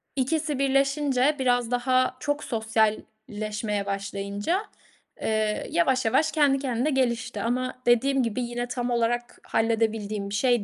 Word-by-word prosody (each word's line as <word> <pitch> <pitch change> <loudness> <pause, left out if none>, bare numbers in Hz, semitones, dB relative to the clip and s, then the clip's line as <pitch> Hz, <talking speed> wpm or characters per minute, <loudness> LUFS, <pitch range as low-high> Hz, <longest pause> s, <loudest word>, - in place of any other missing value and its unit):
İkisi 295 +2 0
birleşince 275 0 +2
biraz 245 -2 +1
daha 255 +1 +1
çok 290 +3 -2
sosyalleşmeye 215 -2 -2
başlayınca, 200 - -2 0.6
eee, 215 -1 0
yavaş 255 +10 +2
yavaş 305 +8 +2
kendi 285 -3 +3
kendine 260 +1 -1
gelişti 245 -4 0
ama 255 +2 -1
dediğim 260 +3 +3
gibi 230 +1 -2
yine 240 0 -3
tam 245 0 -3
olarak 240 +1 -1
halledebildiğim 220 -2 0
bir 200 - -3
şey 240 0 +2
240 Hz, 125 wpm, -26 LUFS, 220-265 Hz, 0.6 s, kendi